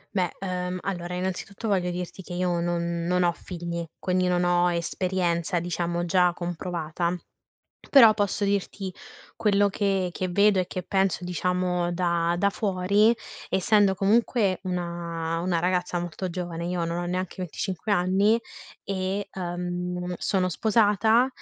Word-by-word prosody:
Beh, 180 -3 +2
ehm, 180 -1 -2
allora, 180 -2 -3
innanzitutto, 190 +4 -4
voglio 185 -4 +1
dirti 180 +1 -5
che 180 - -9
io 180 -1 0
non 170 0 -1
non 180 0 +2
ho 175 - +4
figli, 170 -1 -5
quindi 185 -1 0
non 180 0 +2
ho 175 0 +3
esperienza, 175 0 0
diciamo, 175 0 -2
già 180 0 +3
comprovata. 175 -1 -3 0.8
Però, 230 -6 +8
posso 205 0 0
dirti 200 -1 -2 0.4
quello 205 -2 +3
che 195 -2 0
che 185 +1 -2
vedo 200 +2 +4
e 180 - -3
che 185 -1 -5
penso, 190 -1 +1
diciamo, 180 0 0
da 170 -1 +1
da 200 - +3
fuori, 200 +2 +3 0.4
essendo 195 0 +3
comunque 205 -1 +2
una 170 -2 -3
una 175 -1 0
ragazza 180 +1 0
molto 175 +2 -4
giovane- 170 -1 -4
io 175 -1 -1
non 170 +1 -2
ho 175 - -2
neanche 185 0 -2
25 185 +3 -4
anni- 200 +4 +3 0.5
e, 195 +1 -2
ehm, 180 0 -3
sono 185 0 0
sposata, 220 +4 +3
180 Hz, 140 wpm, -26 LUFS, 175-195 Hz, 0.8 s, Però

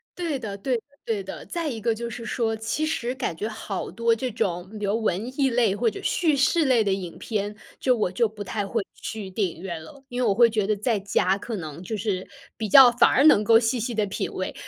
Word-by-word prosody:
对 330 -6 -2
的， 205 -5 -5
对 245 +4 0
的， - - -11 0.2
对 215 -4 -1
的。 190 - -8
再 335 -2 -3
一 235 -5 -4
个 230 0 +1
就 235 +1 -5
是 235 -1 -7
说， 225 0 -1
其 220 +8 -2
实 250 -6 -2
感 250 -10 -3
觉 205 +7 -3
好 215 -3 -5
多 230 0 +1
这 255 +3 -3
种 185 -5 -2
比 210 - -3
如 210 +3 0
文 215 +2 -1
艺 270 -1 +4
类 235 -5 +2
或 230 +2 +2
者 215 - -8
叙 320 -4 +2
事 290 +4 +3
类 250 -4 +4
的 200 - 0
影 180 -3 -5
片， 210 -2 -3 0.2
就 255 -1 +3
我 210 -5 0
就 230 +4 +2
不 210 -1 -8
太 205 +1 -3
会 225 +1 -1
去 215 -3 -6
电 190 +1 0
影 165 -1 -10
院 170 -4 -5
了， 270 - -14
因 250 +1 -3
为 240 - +2
我 200 - +3
会 235 +3 +6
觉 215 -3 0
得 215 - +2
在 215 +1 0
家 195 -1 +1
可 225 +3 -5
能 160 -2 -7
就 220 - -4
是 195 -3 -2 0.3
比 220 - -2
较 255 +3 +9
反 240 0 +5
而 270 - +3
能 215 -9 +7
够 225 +2 +6
细 235 +1 0
细 235 +2 -2
地 215 -1 +1
品 195 - -3
味。 185 - -3
220 Hz, 275 characters per minute, -25 LUFS, 200-240 Hz, 0.3 s, 较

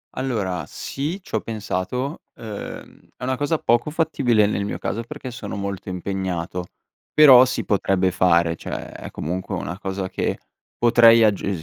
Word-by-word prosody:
Allora, 105 -10 -2
sì, 155 +8 -4
c'ho - - -1
pensato, 115 - -3
uhm, 110 -3 -8 0.2
è - - -11
una 130 +1 0
cosa 145 +4 0
poco 120 +3 +1
fattibile 140 -9 +2
nel 100 -1 -1
mio 100 - -3
caso, 115 - -3
perché 130 +1 -8
sono 120 - -6
molto 100 -1 -5
impegnato, 90 -1 -3 0.4
però 130 -4 +8
si 125 - -3
potrebbe 95 -2 +1
fare, 85 -2 +3
cioè, - - -6
è - - -8
comunque 90 +4 -4
una 90 +5 -5
cosa 95 -2 -4
che - - -2 0.4
potrei 115 -1 +6
aggiu 105 -2 +2
105 Hz, 150 wpm, -22 LUFS, 95-125 Hz, 0.4 s, però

